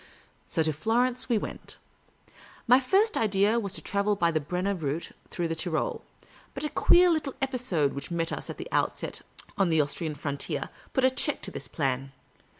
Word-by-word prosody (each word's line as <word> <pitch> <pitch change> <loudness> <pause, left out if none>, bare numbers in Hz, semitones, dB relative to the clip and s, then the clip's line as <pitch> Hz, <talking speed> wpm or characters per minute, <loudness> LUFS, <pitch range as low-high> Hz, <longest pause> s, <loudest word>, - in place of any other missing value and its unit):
So 160 - +1
to 155 0 0
Florence 240 - 0
we 235 - +3
went. - - -6 0.9
My 250 +2 +7
first 395 - +3
idea 210 +1 +3
was 200 -4 -2
to - - -2
travel 200 +1 +1
by 170 -3 +2
the 160 - +1
Brenner 180 +6 -1
route 160 -2 -3 0.2
through 175 - -2
the 165 - -1
Tyrol; 160 -1 -1 0.5
but 275 - -5
a 300 - -1
queer 360 +1 +6
little 305 -4 -1
episode 245 - 0
which 140 - -6
met 165 -1 -1
us - - -5
at - - -6
the - - -6
outset - - -1 0.4
on 195 -3 +4
the 160 -1 +3
Austrian 150 +1 0
frontier 140 -1 -3 0.2
put 265 - +1
a 260 - +5
check - - 0
to - - -1
this - - -7
plan. 135 -2 -2
195 Hz, 185 wpm, -28 LUFS, 155-250 Hz, 0.9 s, My